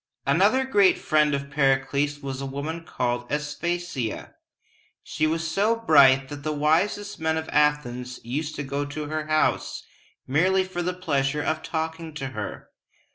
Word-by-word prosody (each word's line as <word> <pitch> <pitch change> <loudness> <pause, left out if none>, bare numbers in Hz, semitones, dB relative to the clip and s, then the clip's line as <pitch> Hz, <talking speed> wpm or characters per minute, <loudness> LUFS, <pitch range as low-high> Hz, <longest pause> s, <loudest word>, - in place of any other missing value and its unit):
Another 200 - +3
great 205 -7 +4
friend 150 -2 +2
of 140 0 -5
Pericles 140 +1 +1
was 135 -1 -5
a - - -3
woman 150 +5 -5
called 120 -5 -2
As 150 0 -2
pa´sia. 170 -9 -3 0.7
She 155 - 0
was 160 +1 -1
so 200 +8 +2
bright 140 -11 +5
that 145 0 -7
the 155 +2 -2
wisest 170 +8 0
men 160 0 0
of 160 - -4
Athens 125 -4 0
used 145 +6 -3
to 145 - -3
go 140 +1 -2
to 145 +1 -5
her 155 0 -3
house 155 0 0 0.4
merely 185 +8 +2
for 185 -1 -4
the 180 +1 -2
pleasure 145 -4 0
of 155 +1 -1
talking 160 -1 -4
to 135 -3 -4
her. 130 - -7
150 Hz, 160 wpm, -25 LUFS, 140-165 Hz, 0.7 s, bright